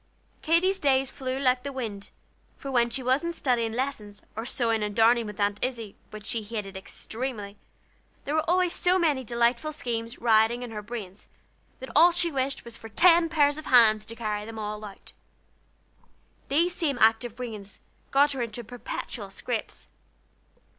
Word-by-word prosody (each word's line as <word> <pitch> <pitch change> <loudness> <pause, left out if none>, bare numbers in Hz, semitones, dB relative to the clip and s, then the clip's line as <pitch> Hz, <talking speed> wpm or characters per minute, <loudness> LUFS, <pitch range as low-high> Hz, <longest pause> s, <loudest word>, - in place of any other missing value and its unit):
Katy's 370 +4 +2
days 270 -3 +2
flew 260 -1 -4
like 255 -2 +2
the 280 - -5
wind; 220 -7 -5 0.5
for 275 - -6
when 240 -2 +3
she 260 +2 -2
wasn't 290 +7 +1
studying 235 -6 0
lessons, 225 -5 -4
or 225 +2 -4
sewing 230 -3 +1
and 210 -1 -3
darning 230 0 +4
with 210 -1 -9
Aunt 205 0 0
Izzie, 230 -5 -3
which 215 -1 -10
she 225 +1 -1
hated 210 -2 -6
extremely, 210 +1 -6 0.7
there 290 - -2
were 315 +1 0
always 360 0 +2
so 360 +1 +3
many 305 -7 +1
delightful 235 +5 +1
schemes 230 -5 -4
rioting 230 +1 +3
in 240 - -7
her 210 -1 -5
brains, 210 -3 -8 0.5
that 260 - -8
all 335 +4 +7
she 340 0 +1
wished 270 -1 -1
for - - -30
was 235 -1 -9 0.2
ten 340 -1 +6
pairs 295 -2 +2
of 310 - -9
hands 220 -4 +6
to 230 - -6
carry 210 -2 -3
them 225 +1 -8
out. 210 -1 -7 1.4
These 335 +5 +2
same 285 -6 0
active 225 0 +3
brains 215 -5 -7 0.3
got 285 +2 +4
her 270 -3 -3
into 235 0 -4
perpetual 240 +2 -6
scrapes. - - -5
240 Hz, 165 wpm, -27 LUFS, 220-280 Hz, 1.4 s, all